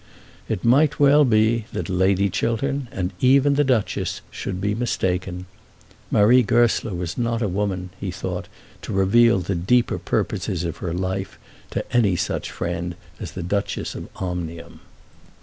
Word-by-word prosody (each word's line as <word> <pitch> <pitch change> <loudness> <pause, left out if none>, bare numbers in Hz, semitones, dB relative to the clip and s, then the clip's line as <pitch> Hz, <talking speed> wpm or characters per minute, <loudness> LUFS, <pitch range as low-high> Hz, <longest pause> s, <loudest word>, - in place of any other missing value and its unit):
It 90 - -2
might 145 +5 +4
well 145 +1 +6
be 110 -2 +3
that - - -3
Lady 95 +1 +2
Chiltern, 125 +7 -1
and 95 0 -3
even 140 +2 +4
the 145 +1 +3
Duchess, 125 -6 0
should 90 -1 -5
be 105 +2 0
mistaken. 95 -5 -2 0.6
Marie 120 +5 +5
Goesler 115 -2 +2
was 85 +4 -4
not 115 -1 0
a - - +1
woman, 95 -1 -2
he - - -3
thought, - - -4 0.3
to - - -6
reveal 115 +4 +4
the 95 +3 -2
deeper 110 +8 +1
purposes 90 -2 -2
of 85 -2 -4
her 85 - -4
life 95 +2 -3 0.3
to - - -3
any 105 -7 +4
such 90 +1 -2
friend 85 0 -4 0.2
as - - -7
the 90 - -5
Duchess 100 +3 -2
of - - -8
Omnium. 85 -3 -5
100 Hz, 150 wpm, -23 LUFS, 90-120 Hz, 0.6 s, well